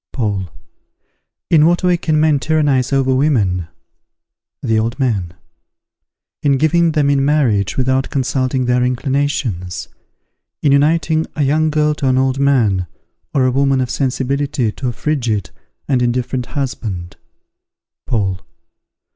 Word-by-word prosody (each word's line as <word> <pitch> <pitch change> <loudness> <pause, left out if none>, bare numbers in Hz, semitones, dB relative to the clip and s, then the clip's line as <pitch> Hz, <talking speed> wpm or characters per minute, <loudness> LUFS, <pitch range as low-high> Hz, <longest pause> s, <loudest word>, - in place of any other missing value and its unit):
Paul. 100 -7 -2 1.0
In 155 -2 +6
what 175 +2 +1
way 180 -1 +3
can 160 -2 0
men 155 -2 +3
tyrannize 145 -4 +1
over 135 -1 +2
women? 105 - +1 1.0
The 110 -1 +1
Old 115 +4 -2
Man. 100 -10 -1 1.1
In 140 -2 +2
giving 165 +3 +2
them 145 -2 +2
in 140 -1 +2
marriage 130 -9 +1
without 130 0 +1
consulting 130 -1 -1
their 125 0 +2
inclinations; 125 - -2 0.7
in 145 - +3
uniting 155 +2 +2
a 150 - 0
young 155 +3 +2
girl 150 0 +1
to 145 -2 -2
an 130 0 +2
old 130 0 +1
man, 115 -10 +2 0.5
or 130 -2 +3
a 130 - +2
woman 135 0 +2
of 130 -1 -1
sensibility 135 -2 -1
to 130 - -5
a - - 0
frigid 120 - -2 0.4
and 130 -3 +1
indifferent 125 +1 -1
husband. 105 -10 -4 0.9
_Paul. 100 -6 0
130 Hz, 130 wpm, -17 LUFS, 120-145 Hz, 1.1 s, In